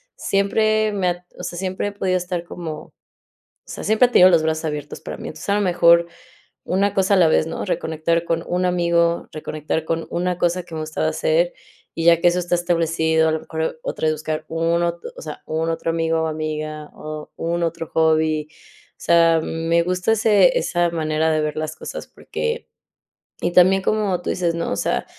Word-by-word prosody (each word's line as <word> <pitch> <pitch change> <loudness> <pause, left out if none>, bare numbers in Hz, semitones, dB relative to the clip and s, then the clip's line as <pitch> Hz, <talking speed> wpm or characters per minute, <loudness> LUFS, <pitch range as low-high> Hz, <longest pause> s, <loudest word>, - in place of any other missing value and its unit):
siempre 215 +2 +1
me 195 -3 0
ha 175 0 -5
o - - -7
sea, 175 - -5
siempre 190 +1 -2
he - - -9
podido 190 -2 -1
estar 175 -1 -4
como 165 -3 -7 0.7
o - - -17
sea, - - -7
siempre 220 +4 +4
ha - - -17
tenido 185 - +8
los 170 -3 +4
brazos 160 0 -1
abiertos 150 -2 -5
para - - -7
mí, 230 - -7
entonces, - - -8
a 200 - +3
lo 210 - +1
mejor 170 -2 +4 0.6
una 195 +2 +1
cosa 195 +1 +2
a - - +3
la 175 -3 +5
vez, 155 - +2
¿no? - - -4
Reconectar 165 -2 -1
con 165 0 -1
un 180 +1 0
amigo, 170 -1 +1
reconectar 155 +1 -3
con 165 0 -2
una 180 0 -1
cosa 175 +1 0
que 165 -1 -10
me 155 - -3
gustaba 155 0 -2
hacer, - - +1 0.4
y 165 - -2
ya 170 -1 +6
que - - +5
eso 175 +1 0
está 175 0 0
establecido, 165 -2 +1
a - - +1
lo 160 - -1
mejor 160 0 -4
otra - - -3
vez 155 - +2
buscar 155 0 -4
un 165 +1 +1
ot 170 0 -2 0.2
o - - -8
sea, 155 -1 -8
un 160 +1 -1
otro 165 0 -2
amigo 165 0 0
o - - 0
amiga, 155 -1 -4
o 155 0 -7
un 170 +1 -1
otro 165 0 -3
hobby, 155 -1 +2
o - - -24
sea, 165 -1 +4
me 165 +1 0
gusta 180 +4 0
ese 220 - +4
esa 175 - 0
manera 160 -1 0
de 155 0 +1
ver 150 0 -2
las 155 0 -3
cosas - - -7
porque 470 0 -4 0.7
Y - - 0
también 185 +2 +5
como 200 -4 0
tú - - -4
dices, 170 -2 -1
¿no? 170 - -2
O - - 0
sea, - - -1
170 Hz, 205 wpm, -21 LUFS, 160-180 Hz, 0.7 s, tenido